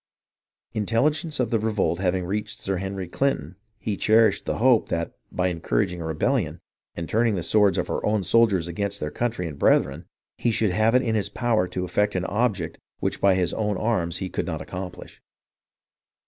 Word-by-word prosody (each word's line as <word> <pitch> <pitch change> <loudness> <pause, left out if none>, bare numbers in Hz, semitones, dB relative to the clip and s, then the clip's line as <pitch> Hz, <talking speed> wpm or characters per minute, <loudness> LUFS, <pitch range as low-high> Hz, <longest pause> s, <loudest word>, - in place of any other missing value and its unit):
Intelligence 145 - 0
of 120 -3 0
the 115 - +2
revolt 105 -5 0
having 90 -1 0
reached 105 +3 -3
Sir 95 -1 -2
Henry 95 0 -4
Clinton, 90 - -1 0.2
he 110 -2 -3
cherished 110 +2 +3
the - - -1
hope 120 -1 +4
that, 85 0 -2 0.2
by 90 0 0
encouraging 90 +1 -1
a - - -4
rebellion, 80 - 0 0.4
and 85 -1 -4
turning 115 -1 +2
the 90 - -2
swords 105 +2 +3
of - - 0
our - - -2
own 105 -1 +1
soldiers 100 -6 +3
against 100 +3 -3
their 75 - -3
country 115 -5 -2
and 75 -3 -8
brethren, 70 +6 +2 0.3
he 120 - +1
should 110 -3 +2
have 110 +5 +3
it 130 - +4
in 115 - 0
his 105 -3 0
power 115 -6 +1
to 90 +1 -3
effect 105 +2 0
an 90 0 0
object, 100 -7 -1 0.2
which - - -2
by 100 -1 +5
his 90 -3 +1
own 105 -3 -1
arms 90 -7 0
he 95 - -3
could - - -3
not - - -3
accomplish. 90 -1 -8
100 Hz, 190 wpm, -25 LUFS, 90-110 Hz, 0.4 s, by